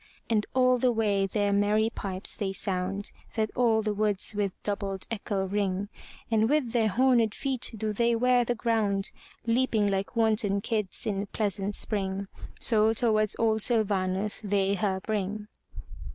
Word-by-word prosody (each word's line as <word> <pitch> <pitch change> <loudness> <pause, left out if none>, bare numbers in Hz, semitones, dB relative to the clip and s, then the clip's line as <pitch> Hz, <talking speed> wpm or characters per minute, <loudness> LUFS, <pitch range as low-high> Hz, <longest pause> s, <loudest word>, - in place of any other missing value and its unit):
And 215 -2 +1
all 255 -1 +4
the 250 0 +3
way 205 -4 +1
their 205 0 0
merry 210 +2 +2
pipes 190 -3 -3
they 195 -3 -2
sound, 195 0 -3 0.2
That 215 -1 0
all 225 -3 +3
the 210 -1 0
woods 210 0 -1
with 200 -2 0
doubled 200 -2 -3
echo 200 -3 -2
ring; 200 0 -1 0.4
And 220 0 +3
with 290 -5 +1
their 230 -2 +2
horned 235 0 +3
feet 265 -3 -1
do 215 0 -2 0.2
wear 250 +1 +3
the 240 +1 -1
ground. 215 -4 0 0.3
Leaping 230 -3 +2
like 195 +4 -2
wanton 215 -3 +2
kids 210 -3 -3
in 200 -1 -2
pleasant 200 -1 -2
Spring. 195 -2 -2 0.3
So 220 -1 +4
towards 215 -3 +2
old 220 -1 +2
Syl 230 0 +4
va'nus 195 +1 -1
they 200 -1 +1
her 195 -2 -1
bring. 210 0 -3
210 Hz, 150 wpm, -28 LUFS, 200-225 Hz, 0.4 s, all